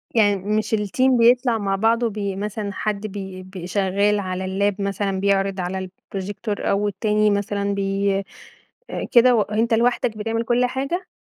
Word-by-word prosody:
يعني 205 -2 +4
مش 215 +3 -1
الteam 250 +5 +2
بيطلع 240 0 +4
مع 195 -2 -1
بعضه 230 +3 +2
بي 200 -2 -3
مثلًا 205 +1 -4
حد 215 0 -2
بي 190 -2 -7
بي 185 -2 -8
شغاّل 200 +2 +1
على 185 -1 -3
اللاب 200 +2 0
مثلًا 195 -1 -1
بيعرض 195 0 +1
على 185 +1 -3 0.3
الprojector 205 +4 -5
أو 205 +1 0
التاني 210 +1 +1
مثلًا 200 0 -1
بي 195 0 0
أ 200 - -10
كده 245 0 +6
وأنت 220 +2 +1
لوحدك 235 -1 +1
بتعمل 225 +2 -1
كل 245 +2 +2
حاجة؟ 275 +9 -3
205 Hz, 155 wpm, -22 LUFS, 195-225 Hz, 0.3 s, كده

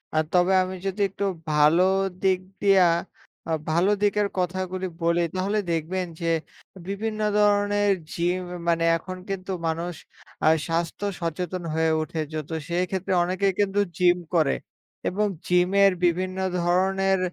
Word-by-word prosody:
আ - - +2
তবে 180 +1 +3
আমি 185 0 -5
যদি 195 +2 -2
একটু 200 +2 -3 0.3
ভালো 150 +4 +5 0.4
দিক 190 -1 +3 0.2
দিয়া 195 -3 +5 0.6
আ - - -1 0.2
ভালো 170 +5 +3
দিকের 205 0 +2
কথাগুলি 185 +1 -2 0.2
বলি 170 +1 +2
তাহলে 195 +3 0
দেখবেন 175 +3 -1 0.2
যে 165 - -1 0.6
বিভিন্ন 215 +2 -3 0.2
ধরনের 205 0 +3 0.2
জিম 175 +2 0 0.3
মানে 165 0 +2
এখন 185 +3 -8
কিন্তু 195 0 -4 0.2
মানুষ 170 +2 -2 0.5
আ - - +5 0.2
স্বাস্থ্য 165 +4 -2 0.2
সচেতন 175 +2 -3
হয়ে 160 0 +2
উঠেছে 155 -1 -4
তো - - -5 0.2
সেই 175 +1 +1
ক্ষেত্রে 190 0 -2
অনেকেই 190 +2 0
কিন্তু 200 0 +1 0.2
জিম 180 -1 +4 0.2
করে 155 -4 +3 0.5
এবং 210 +3 0 0.2
জিমের 190 +3 +4
বিভিন্ন 185 +2 0 0.2
ধরনের 190 +2 +2
185 Hz, 135 wpm, -25 LUFS, 170-195 Hz, 0.6 s, ভালো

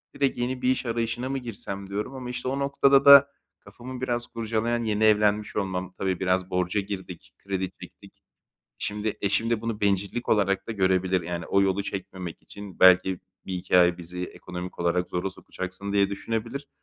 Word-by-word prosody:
direkt 140 -3 +1
yeni 125 +1 -2
bir 125 - +2
iş 130 - 0
arayışına 115 +2 -2
mı 135 - -1
girsem, 100 -5 -6
diyorum 105 +6 -3
ama 125 -2 -6
işte 125 +1 -5
o 135 +2 -1
noktada 140 0 +4
da 140 0 +10 0.3
kafamı 125 +1 -10
biraz 120 -2 -2
kurcalayan, 115 +1 -1
yeni 110 -1 0
evlenmiş 105 -1 +3
olmam. 95 -2 -2
Tabii 95 -2 -1
biraz 95 0 0
borca 90 +2 0
girdik, 95 -3 -8
kredi 95 -1 -2
çektik. - - -14 0.6
Şimdi 105 +1 -3
eşim 105 +3 0
de 115 -2 +1
bunu 115 -2 -4
bencillik 100 +4 0
olarak 100 -2 +2
da - - -1
görebilir, 95 -2 +1
yani 85 0 -4
o 100 0 +3
yolu 95 +1 +1
çekmemek 95 -3 -6
için 100 -2 -11
belki 95 0 +6 0.3
1-2 90 -1 +1
ay 90 0 +4
bizi 90 +1 -5
ekonomik 90 0 -8
olarak 85 +1 0
zora 90 +2 -2
sokacaksın 95 +1 -7
diye 100 -1 +3
düşünebilir. 115 +7 -4
100 Hz, 170 wpm, -26 LUFS, 95-115 Hz, 0.6 s, da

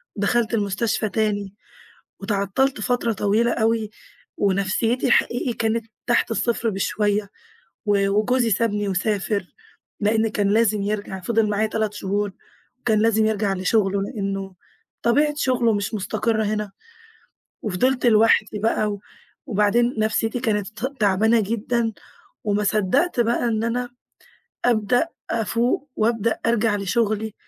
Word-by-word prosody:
دخلت 225 +3 0
المستشفى 210 +1 0
تاني، 205 -3 -1 0.7
واتعطلت 210 +5 0
فترة 235 +1 0
طويلة 215 +4 +1
أوي 220 -1 0 0.5
ونفسيتي 205 +6 +1
حقيقي 245 +1 +2
كانت 225 0 -1 0.2
تحت 240 -1 +2
الصفر 230 0 0
بشوية، 205 +1 0 0.6
و 200 -1 +2
وجوزي 230 +4 +2
سابني 205 0 0
وسافر، 200 +1 -1 0.6
لأن 220 +2 +2
كان 205 -1 0
لازم 215 -1 +2
يرجع، 205 -2 -3
فضِل 220 +2 +1
معايا 210 +1 +1
3 215 -1 -2
شهور 205 0 -2 0.5
كان 220 -2 +3
لازم 220 -1 +3
يرجع 210 -2 0
لشغله، 195 +1 +1
لأنه 195 -3 -4 0.5
طبيعة 295 +5 +2
شغله 250 -5 +2
مش 205 +2 -2
مستقرة 215 +2 -1
هنا. 210 -1 -2 0.9
وفضلت 245 +6 0
لوحدي 215 -2 +4
بقى، 215 0 +1
و 205 - -5 0.5
وبعدين 235 +2 +2
نفسيتي 225 +2 0
كانت 210 -5 0
ت 245 +5 -6
تعبانة 215 +3 +3
جدًا، 225 +2 -1 0.5
وما 210 0 0
صدّقت 215 - +1
بقى 235 +1 +1
إن 225 -1 0
أنا 245 +1 -1 0.8
أبدأ 245 +5 +2 0.2
أفوق، 235 +5 0
وأبدأ 225 0 0
أرجع 225 -2 +2
لشغلي. 215 +2 -1
215 Hz, 120 wpm, -22 LUFS, 205-230 Hz, 0.9 s, لوحدي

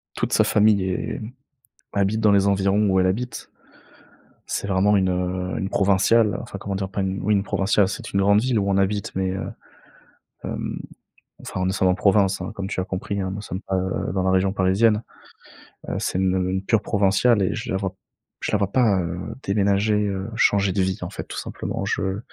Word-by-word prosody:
toute - - -2
sa - - +5
famille 105 -2 +3
est, 90 - -3
mmh, 110 +3 -7 0.6
habite 100 +2 +1
dans 110 -2 +4
les 100 0 +4
environs 100 +1 +2
où 95 -1 +3
elle 95 - +3
habite. 120 +6 -3 1.0
C'est - - -3
vraiment 100 +1 +3
une, 95 -1 +2
heu, 90 0 -2
une 95 - -2
provinciale, 100 +3 +3
enfin 120 -4 -8
comment 100 0 -4
dire 95 0 -2
pas, 95 +1 -3
oui 95 +2 0
une 100 -1 +1
provinciale, 100 0 +2
c'est 95 0 -6
une 100 - +2
grande 100 +1 +4
ville 125 -1 +1
où 100 -1 0
on 95 - +2
habite, 100 +1 -1
mais, 95 0 0
heu, 95 - -4 1.0
hem. - - -4 0.6
Enfin, 95 - -3
nous 95 - +1
sommes 95 -1 +1
en 90 - +3
province 100 -1 +3
hein, 95 - -4
comme 100 -1 -5
tu 95 - -3
as - - -1
compris 100 +2 -4
hein, 95 -1 -2
nous 100 - -5
sommes 95 -2 -6
pas, 95 - -3
heu, 95 0 -2
dans 95 - 0
la 95 - +1
région 95 +1 +2
parisienne. 105 +3 +2 0.9
Heu, - - -2
c'est - - -2
une, 95 -1 +2
heu, 95 0 0
une 95 +1 -2
pure 105 +1 +2
provinciale 100 +3 +2
et 95 - +1
je - - -5
la 95 - +1
vois 95 -1 -2
p - - -32 0.5
je - - -1
la - - +3
vois 100 -1 -1
pas, 110 -6 +3
heu, 85 0 -4 0.3
déménager, 100 +1 +1
heu, 95 0 -3
changer 100 -3 +3
de 95 - +1
vie, 95 0 0
en - - -4
fait, - - -6
tout - - -8
simplement. - - -4
Je 95 +1 -1
100 Hz, 220 wpm, -23 LUFS, 95-105 Hz, 1.0 s, sa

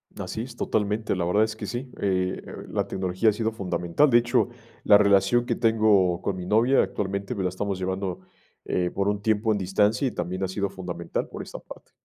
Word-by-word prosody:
Así 110 - -5
es 120 0 -8
totalmente, 105 -2 -1
la 90 - -1
verdad 105 +5 +3
es 110 0 -2
que - - -6
sí, 125 +1 -5
eh, 95 -2 0 0.3
la - - -1
tecnología 95 +3 +1
ha - - +1
sido 110 +1 -1
fundamental. 95 - +1
De 120 - +6
hecho, 120 +1 +2 0.4
la 105 - +7
relación 100 +3 +3
que - - 0
tengo 105 -6 +3
con 100 - -2
mi 90 - -5
novia 115 +6 +4
actualmente 100 +3 -3
me 95 - -2
la 90 - +1
estamos 95 +1 -3
llevando, 95 0 -3 0.4
eh, 90 -1 0
por 100 +2 -1
un 105 0 -2
tiempo 110 +1 +1
en 105 - +1
distancia 105 +6 +1
y - - -2
también 90 +1 -3
ha - - +1
sido 100 +1 -2
fundamental 90 -2 -4
por - - -7
esa - - -9
parte. - - -13
100 Hz, 210 wpm, -25 LUFS, 95-110 Hz, 0.4 s, la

